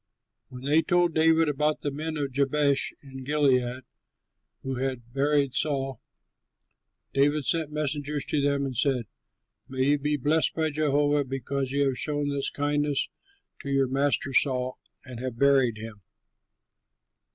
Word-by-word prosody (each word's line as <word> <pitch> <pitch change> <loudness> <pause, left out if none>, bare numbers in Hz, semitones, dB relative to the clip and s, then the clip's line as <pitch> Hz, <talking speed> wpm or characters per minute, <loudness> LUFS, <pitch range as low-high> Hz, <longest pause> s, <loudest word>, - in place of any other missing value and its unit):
When 125 0 -10
they 150 +4 +4
told 175 -1 +2
David 160 0 +4
about 150 +1 0
the 145 - -2
men 155 +2 -4
of 140 -2 -2
Jabesh 140 +1 +2
in 135 -1 -9
Gilead 130 -3 +1 0.8
who 135 -1 -3
had 125 -3 -4
buried 140 -1 +1
Saul, 135 -2 -1 1.1
David 145 +1 +2
sent 160 -1 0
messengers 150 -1 -2
to 150 - 0
them 140 0 +1
and 130 -2 -4
said, 130 -1 +1 0.6
"May 130 +1 0
you 145 0 +3
be 150 +1 0
blessed 150 +4 +1
by 160 -1 0
Jehovah 145 -1 +2
because 135 0 -3
you 140 +1 +1
have 135 -2 -1
shown 145 -1 0
this 140 -1 -1
kindness 145 0 0 0.5
to 140 - -6
your 135 -1 +2
master 135 +1 0
Saul 130 -2 +1 0.3
and 125 -3 -8
have 125 -2 -5
buried 135 -4 +3
him. 110 -2 -9
140 Hz, 145 wpm, -27 LUFS, 130-150 Hz, 1.1 s, they